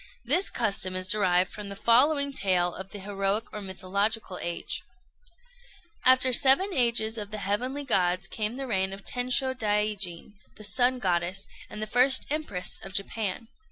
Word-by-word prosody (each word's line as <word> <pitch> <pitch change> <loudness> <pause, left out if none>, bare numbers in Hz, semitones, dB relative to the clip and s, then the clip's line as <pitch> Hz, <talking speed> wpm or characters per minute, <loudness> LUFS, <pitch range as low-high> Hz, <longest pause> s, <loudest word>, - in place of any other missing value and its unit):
This 340 +10 +4
custom 200 -5 0
is 185 0 -1
derived 185 -3 +2
from 210 -1 -7
the 200 - -6
following 280 +6 +2
tale 180 -6 +1
of 190 0 -8
the 205 - -9
heroic 195 +1 -1
or 210 - -6
mythological 195 +1 -2
age: 170 0 -4 1.2
After 255 0 +5
the - - -2
seven 275 +11 +5
ages 235 -4 +1
of 205 -1 -6
the 215 - -5
heavenly 245 +8 -2
gods 185 -6 +1
came 215 +3 -3
the 270 +1 -5
reign 190 -5 -1
of 195 0 -11
Tensho 255 +1 0
Daijin, 210 -5 -2 0.2
the 215 - -10
Sun 250 +4 +2
Goddess, 185 -2 -1 0.2
and 215 0 -6
first 255 +4 +4
Empress 250 -13 -1
of 195 - -8
Japan. 205 +2 -2
210 Hz, 155 wpm, -26 LUFS, 190-250 Hz, 1.2 s, After